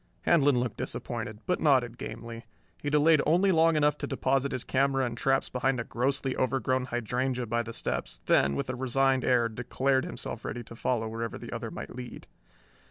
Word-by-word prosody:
Handlon 145 Hz, -6 st, +4 dB
looked 120 Hz, -3 st, -2 dB
disappointed, 105 Hz, 0 st, -5 dB
but 180 Hz, -, 0 dB
nodded 130 Hz, -6 st, +3 dB
gamely. 115 Hz, 0 st, -7 dB, 0.3 s
He 145 Hz, -, -2 dB
delayed 150 Hz, +1 st, +5 dB
only 180 Hz, +5 st, +3 dB
long 165 Hz, -1 st, +4 dB
enough 150 Hz, -1 st, +2 dB
to -, -, -3 dB
deposit 135 Hz, 0 st, 0 dB
his 130 Hz, -, -2 dB
camera 135 Hz, 0 st, +1 dB
and 120 Hz, -1 st, -3 dB
traps 135 Hz, +3 st, +1 dB
behind 130 Hz, 0 st, 0 dB
a -, -, -1 dB
grossly 135 Hz, +3 st, -1 dB
overgrown 130 Hz, 0 st, 0 dB
hydrangea 125 Hz, +1 st, -1 dB
by 120 Hz, +1 st, 0 dB
the 115 Hz, 0 st, -6 dB
steps, -, -, -4 dB
then, 70 Hz, 0 st, +3 dB
with -, -, -2 dB
a -, -, -5 dB
resigned 130 Hz, +1 st, +1 dB
air, 120 Hz, -2 st, +3 dB
declared 130 Hz, +4 st, 0 dB
himself -, -, -6 dB
ready 120 Hz, -, -4 dB
to 115 Hz, -, -12 dB
follow 115 Hz, -1 st, -1 dB
wherever 115 Hz, +1 st, -4 dB
the -, -, -9 dB
other -, -, -4 dB
might -, -, -8 dB
lead. 125 Hz, -1 st, -8 dB
130 Hz, 185 wpm, -29 LUFS, 120-135 Hz, 0.3 s, delayed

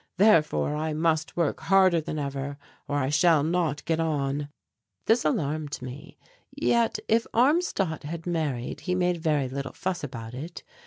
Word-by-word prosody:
Therefore 165 Hz, -7 st, +4 dB
I 155 Hz, +1 st, -2 dB
must 160 Hz, 0 st, 0 dB
work 170 Hz, -4 st, +1 dB
harder 185 Hz, 0 st, +4 dB
than 155 Hz, -, -5 dB
ever 140 Hz, -1 st, -4 dB, 0.3 s
or 145 Hz, -, -1 dB
I 135 Hz, -2 st, 0 dB
shall 150 Hz, 0 st, +4 dB
not 160 Hz, -3 st, 0 dB
get 165 Hz, -1 st, 0 dB
on." 145 Hz, -2 st, -1 dB, 0.6 s
This 230 Hz, +2 st, +3 dB
alarmed 150 Hz, -1 st, -1 dB
me. 130 Hz, +2 st, -9 dB, 0.3 s
Yet, 235 Hz, -1 st, +1 dB
if 225 Hz, +1 st, +2 dB
Armstadt 240 Hz, -, +2 dB
had 160 Hz, +3 st, -6 dB
married 150 Hz, -7 st, -2 dB
he 180 Hz, +5 st, -2 dB
made 180 Hz, -1 st, +1 dB
very 155 Hz, -5 st, +1 dB
little 135 Hz, 0 st, -5 dB
fuss 185 Hz, -3 st, -3 dB
about 115 Hz, -4 st, -6 dB
it. 155 Hz, +7 st, -7 dB
155 Hz, 155 wpm, -27 LUFS, 145-175 Hz, 0.6 s, Therefore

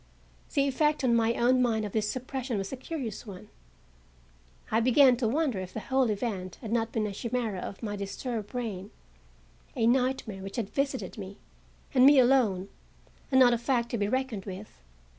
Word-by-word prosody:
The 280 Hz, 0 st, +3 dB
effect 300 Hz, +2 st, +1 dB
on 240 Hz, -2 st, +3 dB
my 230 Hz, 0 st, +2 dB
own 250 Hz, +2 st, +3 dB
mind 225 Hz, -3 st, +1 dB
of 205 Hz, -, -5 dB
this 210 Hz, 0 st, 0 dB
suppression 255 Hz, -2 st, -3 dB
was 195 Hz, +3 st, -4 dB
a -, -, -1 dB
curious 250 Hz, -6 st, -6 dB
one. 185 Hz, -3 st, -10 dB, 1.2 s
I 220 Hz, -, +3 dB
began 255 Hz, +2 st, +5 dB
to 240 Hz, -2 st, 0 dB
wonder 270 Hz, -3 st, 0 dB
if 185 Hz, -1 st, -7 dB
the -, -, -2 dB
whole 260 Hz, +1 st, +1 dB
event 200 Hz, -4 st, -3 dB
had 220 Hz, -4 st, -8 dB
not 225 Hz, -1 st, 0 dB
been 220 Hz, -1 st, -1 dB
a 210 Hz, -, -3 dB
chimera 230 Hz, -2 st, -2 dB
of 195 Hz, +4 st, -7 dB
my 205 Hz, -2 st, -3 dB
disturbed 205 Hz, +2 st, -4 dB
brain—a 65 Hz, -, -7 dB
nightmare 250 Hz, -5 st, +1 dB
which 195 Hz, +1 st, -7 dB
had 220 Hz, -5 st, -3 dB
visited 275 Hz, -5 st, -2 dB
me, 195 Hz, 0 st, -8 dB, 0.6 s
and 255 Hz, -2 st, +5 dB
me 285 Hz, 0 st, +7 dB
alone, 240 Hz, -7 st, +3 dB, 0.6 s
and 260 Hz, -, +4 dB
not 245 Hz, -2 st, +7 dB
a 235 Hz, -, 0 dB
fact 240 Hz, -1 st, 0 dB
to 235 Hz, -, -2 dB
be 205 Hz, -, +1 dB
reckoned 255 Hz, -4 st, -2 dB
with. 195 Hz, +2 st, -8 dB
230 Hz, 180 wpm, -28 LUFS, 200-255 Hz, 1.2 s, me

